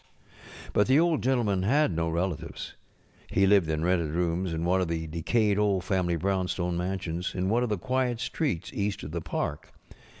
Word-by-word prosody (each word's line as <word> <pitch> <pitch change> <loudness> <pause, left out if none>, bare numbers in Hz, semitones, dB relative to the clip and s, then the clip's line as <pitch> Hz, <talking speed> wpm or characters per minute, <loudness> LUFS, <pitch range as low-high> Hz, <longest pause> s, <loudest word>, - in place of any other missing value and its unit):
But 105 - +3
the 135 +3 +5
Old 165 -2 +2
Gentleman 120 -7 +1
had 140 +7 +3
no 85 0 0
relatives. 85 -1 -3 0.5
He 95 - +2
lived 95 -4 +4
in 80 +1 0
rented 85 -3 +1
rooms 85 +2 -1
in 80 +1 -2
one 95 +2 +2
of 90 - 0
the 80 -1 -2
decayed 100 +6 +1
old 100 -3 +2
family 90 -4 0
brownstone 90 0 -1
mansions 90 -1 -3
in 95 0 0
one 115 +3 +2
of 125 - 0
the 105 - 0
quiet 125 +3 -1
streets 125 - -2
east 100 0 -2
of 75 - -6
the 85 +1 -3
park. 75 -2 -4
95 Hz, 180 wpm, -28 LUFS, 85-105 Hz, 0.5 s, the